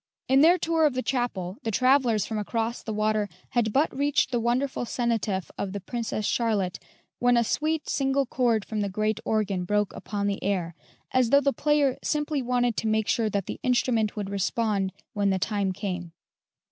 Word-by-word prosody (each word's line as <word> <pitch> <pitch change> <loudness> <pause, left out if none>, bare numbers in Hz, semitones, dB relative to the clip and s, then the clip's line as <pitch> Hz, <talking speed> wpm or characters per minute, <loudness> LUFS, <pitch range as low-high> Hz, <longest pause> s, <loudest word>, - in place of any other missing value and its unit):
In 265 +1 +5
their 340 +4 +6
tour 325 -2 +2
of 275 - -3
the 255 - -1
chapel 215 -8 -2
the 225 - -3
travellers 250 -2 +3
from 220 -1 -3
across 230 +2 -2
the 220 - -5
water 215 -1 0 0.2
had 235 -3 +1
but 280 +6 +1
reached 285 -1 +1
the 240 - +1
wonderful 245 +3 0
cenotaph 225 -6 -1
of 195 -1 -3
the 200 - -3
Princess 220 +1 -3
Charlotte, 205 -7 0 0.4
when 245 0 +4
a 235 - +4
sweet 310 +6 -1
single 275 0 +1
chord 235 -4 +1
from 215 -1 -3
the 200 - -1
great 215 +2 -1
organ 200 -4 0
broke 210 +2 0
upon 205 0 -4
the 200 -1 -2
air, 185 -4 -1 0.4
as 255 -2 +3
though 280 - +6
the 280 -1 +1
player 295 -3 +2
simply 295 -1 -1
wanted 245 -2 +1
to 225 - -1
make 220 -1 +1
sure 225 -2 +1
that 200 -2 -1
the - - -6
instrument 240 -4 +1
would 200 -2 -4
respond 200 0 0 0.2
when 205 -2 +1
the 190 - +2
time 200 0 0
came. 180 -3 -5
225 Hz, 190 wpm, -26 LUFS, 200-255 Hz, 0.4 s, their